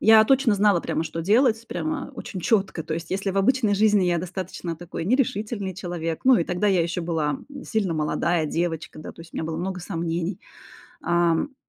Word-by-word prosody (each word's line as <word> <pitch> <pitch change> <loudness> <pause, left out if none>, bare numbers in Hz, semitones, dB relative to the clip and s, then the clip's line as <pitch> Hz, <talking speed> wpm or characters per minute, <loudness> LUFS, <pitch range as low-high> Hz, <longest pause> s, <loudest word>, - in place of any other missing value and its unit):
Я 220 0 +7
точно 265 -2 +3
знала 200 -3 +3
прямо, 160 - -2
что 165 +1 -4
делать, 225 +4 +3
прямо 310 -3 -3
очень 190 - -6
четко. 195 -4 +1
То 155 - -5
есть 165 0 -6
если 195 +1 -1
в 195 - -1
обычной 215 0 +3
жизни 210 -2 +4
я 175 -1 +2
достаточно 180 -1 -5
такой 165 0 -6
нерешительный 210 -3 0
человек, 170 -3 -4
ну, 260 0 +7
и - - +2
тогда 180 +5 -1
я 190 -4 +3
еще 170 +2 -2
была, 165 -3 0
м, - - -5 0.2
сильно 200 -7 -1
молодая 160 +2 0
девочка, 165 0 -3
да. 155 - -8
То - - -15
есть 165 - -16
у - - -8
меня - - -2
было 160 0 -3
много 185 +1 -3
сомнений, 170 0 -3 0.6
ам, 170 -1 +2
м, 270 - -30
180 Hz, 205 wpm, -24 LUFS, 165-210 Hz, 0.6 s, Я